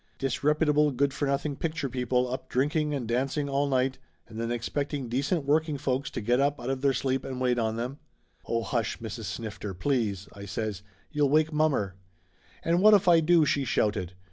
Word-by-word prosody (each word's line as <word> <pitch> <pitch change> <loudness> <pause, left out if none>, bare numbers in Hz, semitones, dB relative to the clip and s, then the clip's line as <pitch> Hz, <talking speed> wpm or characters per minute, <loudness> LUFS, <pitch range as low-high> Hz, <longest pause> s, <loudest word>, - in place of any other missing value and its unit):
"Disreputable 150 +3 +2
good 140 +1 0
for 145 - -1
nothing 140 +1 -1
picture 160 -1 -2
people 125 0 0
up 130 - -6
drinking 150 +4 +1
and 125 -5 -3
dancing 135 +5 0
all 140 +1 +1
night 130 -1 +1 0.3
and 115 0 -6
then 115 0 -2
expecting 135 +2 -3
de 125 +3 0
cent 145 +1 -1
working 155 +1 +1
folks 135 -1 -1
to - - -5
get 120 +4 +2
up 140 +1 +1
out 125 - -3
of 135 -1 -3
their 140 -1 +3
sleep 130 0 -1
and 130 -1 -5
wait 125 -1 +1
on 110 -1 0
them." 125 +5 -4 0.5
"Oh, 115 0 0
hush, 115 -3 -1
Mrs. 115 0 -6
Snifter, 100 +1 -5
please!" 105 -4 -1
I 100 0 -9
says. 105 -1 -3 0.3
"You'll 150 -2 +2
wake 155 +2 +3
mommer!" 145 -11 +1 0.7
"And 170 +2 +2
what 215 +1 +8
if 200 -2 +2
I 170 -2 +7
do?" 165 0 +4
she 140 -1 +1
shouted. 100 -7 0
135 Hz, 195 wpm, -28 LUFS, 120-150 Hz, 0.7 s, what